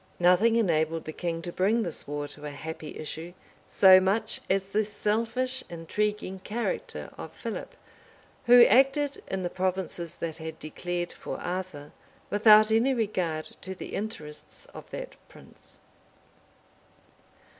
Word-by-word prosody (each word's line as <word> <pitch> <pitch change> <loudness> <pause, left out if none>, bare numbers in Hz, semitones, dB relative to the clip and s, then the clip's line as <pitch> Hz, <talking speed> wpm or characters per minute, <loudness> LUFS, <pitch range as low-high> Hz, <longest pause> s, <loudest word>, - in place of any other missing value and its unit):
{1200.} 175 0 +5
Nothing 225 +5 +3
enabled 165 -7 +1
the 155 - -4
king 165 -1 -3
to 175 - -4
bring 210 +6 +2
this 170 -5 -2
war 145 0 -3
to 150 - -12
a 150 - -4
happy 155 +1 -7
issue 160 +3 -6 0.3
so 190 -1 +8
much 205 +4 0
as 195 0 +2
the 200 +3 0
selfish, 230 +5 -1
intriguing 190 +3 -2
character 235 - -4
of - - -7
Philip, - - -6 0.7
who 240 0 +9
acted, 270 +4 +3
in 190 -1 -3
the 175 - -1
provinces 185 -2 -2
that 165 -1 -5
had 160 0 -7
declared 175 +3 -4
for - - -7
Arthur, 175 -5 -5 0.4
without 215 +1 +7
any 240 +4 +3
regard 180 -8 -1 0.2
to 190 0 -6
the - - -8
interests 155 -8 -6
of - - -11
that - - -7
prince. - - -17
190 Hz, 140 wpm, -28 LUFS, 165-220 Hz, 0.7 s, who